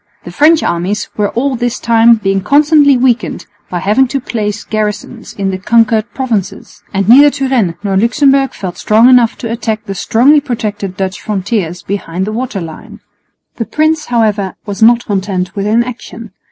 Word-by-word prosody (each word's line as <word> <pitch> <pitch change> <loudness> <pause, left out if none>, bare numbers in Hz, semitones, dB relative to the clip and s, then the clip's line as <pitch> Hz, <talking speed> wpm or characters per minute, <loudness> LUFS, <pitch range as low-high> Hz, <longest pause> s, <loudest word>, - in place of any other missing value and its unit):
The - - -9
French 315 +2 +3
armies 180 +5 -2
were 205 -1 0
all 265 +3 -1
this 240 -1 -2
time 230 0 +4
being 195 -3 -1
constantly 285 - +4
weakened 245 -1 0 0.2
by 180 - -3
having 235 +7 +2
to 275 - -2
place 210 -4 -4
garrisons 215 +2 -4
in 195 -1 -2
the 185 - -4
conquered 225 +2 +1
provinces; 235 -8 -4
and 195 -1 -1
neither 280 +6 +7
Turenne 260 -11 -1
nor 195 -2 -1
Luxemburg 270 +5 +2
felt 180 -3 -6
strong 220 +3 +4
enough 245 -2 +4
to 230 -3 -5
attack 225 -2 -3
the 195 - -5
strongly 250 +10 +3
protected 210 -7 -4
Dutch 190 0 -4
frontiers 190 -4 -3
behind 190 -2 -4
the 215 - -4
water 245 -2 -4
line. 160 -2 -10 0.6
The 230 - -3
prince, 310 +2 0
however, 215 -5 -1
was 205 -1 -6
not 235 +1 +4
content 190 -2 -3
with 200 0 -2
inaction. 230 -1 -3
225 Hz, 165 wpm, -12 LUFS, 195-250 Hz, 0.6 s, neither